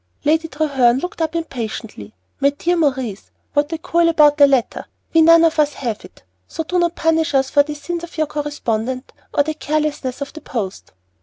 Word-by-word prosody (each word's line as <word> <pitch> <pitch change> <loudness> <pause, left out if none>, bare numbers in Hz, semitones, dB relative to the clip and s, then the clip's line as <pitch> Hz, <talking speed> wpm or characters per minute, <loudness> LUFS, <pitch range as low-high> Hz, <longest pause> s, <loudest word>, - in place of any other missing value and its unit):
Lady 320 +2 +2
Treherne 275 -6 +2
looked 350 +4 -5
up 320 0 -1
impatiently. 225 - -5 0.2
"My 280 - +4
dear 335 +5 -1
Maurice, 265 - -1 0.2
what 290 +2 +1
a 325 - -2
coil 335 +1 +2
about 300 -2 +4
a 285 - +9
letter! 265 -4 0 0.3
We 325 - +6
none 330 +1 +7
of 325 -1 +2
us 295 -1 +3
have 230 -5 -4
it, - - -16 0.2
so 325 - -4
do 360 +3 -1
not 345 -1 +1
punish 325 -2 +1
us 265 0 +2
for 285 - +5
the 300 +1 -4
sins 340 +4 -5
of 340 - -10
your 310 - +2
correspondent 260 -4 -3 0.2
or 285 - +2
the 310 +2 -3
carelessness 300 -4 -2
of 280 -1 -6
the 315 - -10
post." 210 -9 -5
295 Hz, 200 wpm, -19 LUFS, 265-325 Hz, 0.3 s, a